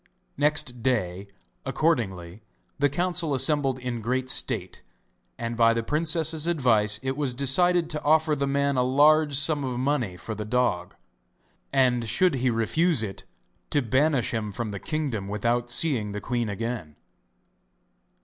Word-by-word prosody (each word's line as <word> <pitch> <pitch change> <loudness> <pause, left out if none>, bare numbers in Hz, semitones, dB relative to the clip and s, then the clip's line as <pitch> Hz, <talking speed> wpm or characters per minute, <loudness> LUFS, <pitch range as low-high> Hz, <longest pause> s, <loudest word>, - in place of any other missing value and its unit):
Next 145 -5 0
day, 100 -6 -1 0.4
accordingly, 100 - -1 0.4
the 145 0 +3
council 170 -1 0
assembled 135 0 +3
in 125 -2 -5
great 130 +3 -1
state, - - -1 0.6
and 115 0 -4
by 115 0 +4
the 115 - -1
princess's 160 +2 -1
advice 110 -10 +2
it 135 0 -2
was 140 -4 -2
decided 170 +6 +2
to 150 - -2
offer 155 0 +3
the 140 -1 -1
man 140 0 0
a - - +3
large 145 +3 +4
sum 145 +1 +1
of 125 -2 -3
money 130 -9 -1
for 110 +5 -6
the 105 - -5
dog, 105 -5 -1 0.8
and 125 -4 +2
should 180 +10 +2
he 130 0 +1
refuse 125 +5 +1
it, 95 -3 -7 0.4
to 145 - +1
banish 130 +3 +1
him 110 -2 -3
from 110 +1 -4
the 100 - -6
kingdom 140 -10 -3
without 120 +4 -1
seeing 125 -6 +1
the 105 - -4
queen 120 0 -2
again. 110 -7 -5
130 Hz, 150 wpm, -25 LUFS, 115-150 Hz, 0.8 s, by